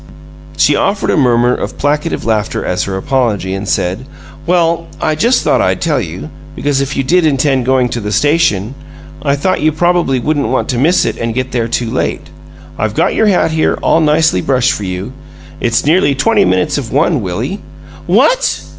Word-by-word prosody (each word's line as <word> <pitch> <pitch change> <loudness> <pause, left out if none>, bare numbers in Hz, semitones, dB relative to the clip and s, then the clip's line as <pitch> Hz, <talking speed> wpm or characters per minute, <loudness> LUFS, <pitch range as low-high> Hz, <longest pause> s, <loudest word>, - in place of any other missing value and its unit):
She - - +3
offered 200 +1 0
a - - +1
murmur 125 -4 +3
of - - -5
placative 150 +3 -1
laughter 110 -3 -1
as 90 - -1
her 95 -1 -3
apology, 105 -5 -1
and 95 +1 -4
said: 95 +8 -1 0.4
"Well, 170 -1 +1
I 155 - 0
just 235 +11 +1
thought - - +2
I'd - - 0
tell 150 -6 0
you 90 - -7 0.2
because 145 -1 0
if 140 +1 -3
you 135 - +1
did 175 +6 +2
intend 135 -4 +1
going 130 -1 +2
to 120 - -3
the 105 0 -4
station, 135 - +1 0.5
I 140 -1 +1
thought 185 +5 -1
you 155 +1 +2
probably 175 -3 +1
wouldn't 145 +2 -1
want 130 +3 -1
to 125 - -1
miss 165 +7 +3
it - - -3
and 115 -1 -3
get 130 +1 -2
there 115 -2 -1
too 115 0 -2
late. - - -3 0.5
I've 110 0 -1
got - - +1
your 220 - +2
hat 185 -5 +2
here 160 0 +1
all - - +3
nicely 155 +1 +2
brushed 130 -4 +1
for 105 -7 -4
you. 95 +6 -5 0.5
It's 120 +3 0
nearly 150 -2 +3
twenty 205 +9 +2
minutes 95 +9 +1
of 120 -6 -7
one, 145 0 +1
Willie." 110 - -4 0.5
"WHAT?" - - +2
135 Hz, 190 wpm, -13 LUFS, 115-160 Hz, 0.5 s, She